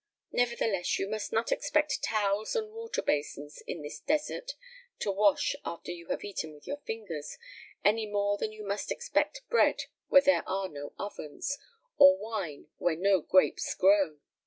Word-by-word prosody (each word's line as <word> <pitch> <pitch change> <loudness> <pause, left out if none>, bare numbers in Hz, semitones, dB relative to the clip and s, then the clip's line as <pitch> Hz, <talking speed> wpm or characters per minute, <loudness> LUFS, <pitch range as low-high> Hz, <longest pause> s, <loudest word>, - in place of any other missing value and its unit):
Nevertheless, 230 -6 +1
you 195 - -1
must 215 0 -3
not 225 +1 0
expect 295 0 +1
towels 210 - 0
and 435 -2 -1
water 455 0 -4
basins 145 0 -2
in 160 - -5
the 145 - -6
desert 310 - 0 0.5
to 200 - +1
wash 200 0 +3
after 170 +1 -5
you 170 -1 -8
have - - -2
eaten 170 -6 -4
with 145 - -17
your 285 - -3
fingers, 180 -10 -5 0.5
any 215 +1 +3
more 205 0 0
than 215 - -1
you 215 -1 -9
must 200 +1 -2
expect - - -1
bread 475 - +4 0.2
where 275 - +7
there 285 - +4
are 190 0 -1
no 145 -1 -8
ovens, 200 - -4 0.4
or 280 0 +9
wine 200 - -5
where 175 -2 +2
no 190 +1 +3
grapes 185 +4 +2
grow." 190 -5 +4
205 Hz, 160 wpm, -30 LUFS, 175-245 Hz, 0.5 s, or